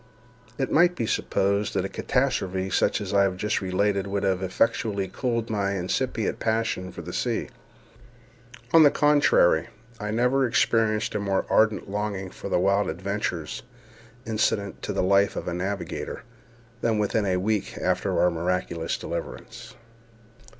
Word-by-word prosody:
It 135 - -1
might 175 +3 +4
be 115 - -2
supposed 100 -1 0
that - - +1
a - - -1
catastrophe 95 0 -1
such - - +1
as 100 -1 -4
I 100 - +5
have 95 -2 +1
just 105 +3 -1
related 100 +1 0
would 100 0 -2
have 95 -1 +1
effectually 100 +1 0
cooled 115 +3 -2
my 100 -2 0
incipient 110 +5 -1
passion 110 -5 -1
for - - -8
the - - -7
sea. - - -1 1.2
On 165 - +8
the 150 - +8
contrary, 145 - +4 0.3
I 105 -1 -4
never 125 +4 +2
experienced 115 -4 +1
a 105 - -1
more 100 -1 0
ardent 110 -2 +3
longing 100 -2 -3
for - - -7
the - - +2
wild 100 +2 +2
adventures 90 -2 -3 0.6
incident 105 -3 -1
to - - -3
the - - 0
life 100 +1 +3
of - - -5
a 85 - -2
navigator 95 +2 -4 0.6
than 115 -2 +1
within 105 0 0
a 90 -1 +1
week 105 +2 -1
after - - 0
our 90 - +4
miraculous 85 0 -2
deliverance. - - -7
100 Hz, 150 wpm, -25 LUFS, 95-110 Hz, 1.2 s, On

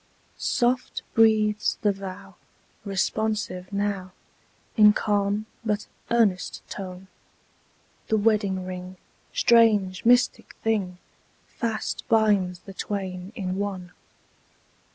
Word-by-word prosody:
Soft 250 0 0
breathes 215 -2 +3
the 205 - +4
vow, 195 0 -8 0.5
responsive 200 -1 -2
now, 200 -2 -2 0.6
In 210 -2 +7
calm 205 0 0 0.2
but 210 -2 -1 0.2
earnest 215 -6 +1
tone. 185 -1 -7 1.0
The 220 - +2
wedding 205 -3 +1
ring, 185 0 -7 0.3
strange, 210 -5 +4
mystic 245 +1 +3
thing! 200 -5 0 0.5
Fast 225 -2 -3
binds 205 -5 +3
the 195 - -11
twain 190 -2 -4
in 185 -4 -3
one. 190 -3 -4
205 Hz, 90 wpm, -25 LUFS, 185-220 Hz, 1.0 s, In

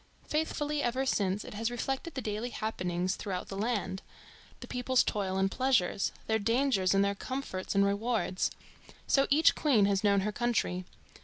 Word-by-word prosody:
Faithfully 300 -1 -1
ever 255 +2 0
since 200 -5 0
it - - -8
has 225 +2 -1
reflected 270 +6 -3
the 260 - -3
daily 215 +3 -3
happenings 180 -6 -2
through 200 - -5
out 180 - -4
the 195 - -5
land, 200 -3 -2 0.6
the - - -9
people's 250 +1 +2
toil 190 -2 -1
and 195 0 +1
pleasures, 250 -8 +1
their 220 0 +1
dangers 230 -4 +2
and 195 0 +4
their 200 - +1
comforts 205 -4 -4
and 200 0 +5
rewards. 200 -2 0 0.6
So 275 0 +3
each 300 +3 +5
queen 250 -10 +3
has 200 0 +1
known 200 -1 +4
her 210 +2 -1
country. 210 -6 -1
215 Hz, 170 wpm, -30 LUFS, 195-255 Hz, 0.6 s, and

